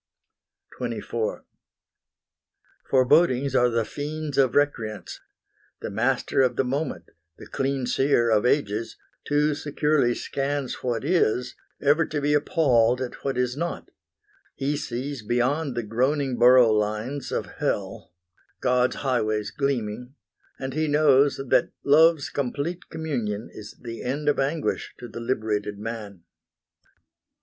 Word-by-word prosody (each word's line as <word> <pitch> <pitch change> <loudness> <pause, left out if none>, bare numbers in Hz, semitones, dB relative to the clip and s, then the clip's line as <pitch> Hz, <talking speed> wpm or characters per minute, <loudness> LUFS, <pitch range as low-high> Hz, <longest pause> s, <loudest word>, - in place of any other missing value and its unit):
XXIV 115 -2 -3 1.5
Forebodings 135 0 +3
are 125 -2 +4
the 115 -1 0
fiends 150 +1 -5
of 135 -3 +3
Recreance; 115 -8 -1 0.6
The - - -5
master 120 +6 +1
of 125 -2 +2
the - - +2
moment, 140 +3 -3 0.3
the - - -11
clean 135 -1 -2
seer 120 -3 +2
Of 105 -1 +3
ages, 115 -4 0 0.3
too 150 +1 +2
securely 145 -3 +1
scans 140 -1 -2
what 120 -1 -2
is, 125 -7 +1 0.3
Ever 145 +3 +3
to 150 - -2
be 145 +1 +1
appalled 125 -5 +3
at 130 -2 -6
what 135 -2 -2
is 125 0 0
not; 170 +4 -4 0.6
He 140 +2 -1
sees 135 0 -4
beyond 125 +6 0
the 120 - -2
groaning 130 +5 0
borough 120 -2 +7
lines 110 +6 -2
Of - - -1
Hell, 95 -2 -3 0.5
God's 125 0 +2
highways 110 -5 0
gleaming, 125 -2 -2 0.4
and 130 0 -5
he 155 +2 0
knows 145 -2 +4
That 135 -2 +2
Love's 155 +1 +4
complete 145 +6 -3
communion 120 -10 -3
is 105 -1 -10
the 115 -1 -7
end 145 +4 -3
Of 145 - +1
anguish 145 +3 -1
to 125 - -8
the 115 - -8
liberated 110 -4 -2
man. 105 -4 -7
130 Hz, 125 wpm, -25 LUFS, 115-145 Hz, 1.5 s, borough